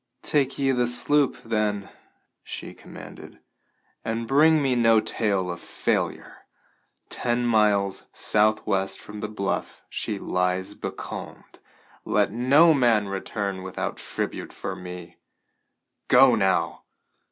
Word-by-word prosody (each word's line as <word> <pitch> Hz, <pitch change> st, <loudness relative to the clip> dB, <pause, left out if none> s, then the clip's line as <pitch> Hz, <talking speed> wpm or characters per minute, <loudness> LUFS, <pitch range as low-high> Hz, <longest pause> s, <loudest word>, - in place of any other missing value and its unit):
"Take 140 Hz, -3 st, 0 dB
ye 135 Hz, -1 st, +2 dB
the 125 Hz, -2 st, +1 dB
sloop, 135 Hz, +4 st, +3 dB
then," 105 Hz, -3 st, -1 dB, 0.6 s
she -, -, -7 dB
commanded, -, -, -12 dB, 0.7 s
"and 115 Hz, +1 st, -3 dB
bring 155 Hz, +4 st, +5 dB
me 135 Hz, -3 st, +1 dB
no 115 Hz, -2 st, +5 dB
tale 100 Hz, -4 st, -1 dB
of 85 Hz, -, -6 dB
failure. -, -, -2 dB, 0.7 s
Ten 120 Hz, 0 st, -1 dB
miles 105 Hz, -4 st, +2 dB
southwest 105 Hz, -2 st, +1 dB
from 105 Hz, 0 st, -10 dB
the 105 Hz, -, -3 dB
bluff 100 Hz, -2 st, -4 dB
she -, -, -3 dB
lies 90 Hz, +1 st, -1 dB
becalmed. -, -, -8 dB, 0.4 s
Let -, -, +1 dB
no 140 Hz, +9 st, +5 dB
man 115 Hz, -7 st, +2 dB
return 100 Hz, 0 st, -3 dB
without 95 Hz, 0 st, -4 dB
tribute -, -, -5 dB
for -, -, -5 dB
me. 90 Hz, -1 st, -9 dB, 0.9 s
Go 130 Hz, 0 st, +7 dB
now!" 95 Hz, -4 st, +1 dB
110 Hz, 115 wpm, -25 LUFS, 100-125 Hz, 0.9 s, Go